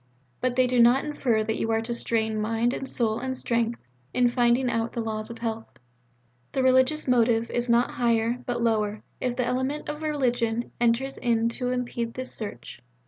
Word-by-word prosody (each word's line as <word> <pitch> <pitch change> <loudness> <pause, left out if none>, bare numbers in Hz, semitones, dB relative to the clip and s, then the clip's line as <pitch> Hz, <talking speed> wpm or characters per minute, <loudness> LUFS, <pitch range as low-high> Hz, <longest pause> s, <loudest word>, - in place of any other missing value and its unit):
But 255 -1 0
they 255 0 +4
do 250 0 +1
not 240 +4 +5
infer 250 -7 0
that 220 +1 -2
you 225 - -1
are 225 0 +2
to 235 +1 -3
strain 220 -2 0
mind 225 +3 0
and 265 - -5
soul 225 -2 0
and 260 +1 -3
strength 235 -1 -1 0.3
in 245 -1 +4
finding 245 +1 +2
out 230 -1 -1
the - - -3
laws 215 -1 -2
of 235 - -7
health. 225 -1 -4 0.9
The 265 - +1
religious 260 +4 +3
motive 235 -2 +2
is 240 0 -1
not 235 +1 +3
higher, 235 0 +1
but 240 -1 -1
lower, 215 -2 0 0.2
if 250 -1 -1
the 250 -1 0
element 260 +4 -2
of 300 +1 -5
religion 245 -6 0
enters 240 +3 +1
in 230 -1 +1
to 245 +1 -1
impede 240 -2 -3
this 255 0 -5
search. 125 - -7
240 Hz, 190 wpm, -26 LUFS, 225-255 Hz, 0.9 s, not